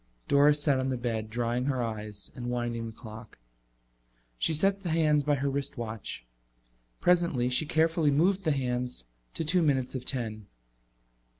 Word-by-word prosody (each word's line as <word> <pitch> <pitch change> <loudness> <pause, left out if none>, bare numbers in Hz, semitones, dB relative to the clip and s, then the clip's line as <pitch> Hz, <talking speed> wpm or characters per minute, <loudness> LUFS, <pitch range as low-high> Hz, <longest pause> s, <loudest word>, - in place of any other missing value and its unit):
Doris 145 +1 +5
sat 140 -3 +3
on 130 0 -1
the 130 - -1
bed 115 -3 -3
drying 120 +2 -1
her 130 -3 0
eyes 105 -2 -5
and 120 -1 -5
winding 120 -1 -2
the - - -6
clock. 110 0 -11 1.0
She - - +1
set 195 +5 +2
the 180 - -4
hands 155 -2 +3
by 145 +1 +1
her 140 0 -1
wristwatch. 120 - -4 0.7
Presently 170 -8 +2
she 145 +5 +3
carefully 160 0 +2
moved 180 +7 +2
the 160 - +2
hands 125 - -1 0.3
to - - -1
two 175 +3 +3
minutes 135 -5 +1
of 130 -2 -4
ten. 110 -5 -3
130 Hz, 160 wpm, -29 LUFS, 120-150 Hz, 1.0 s, Doris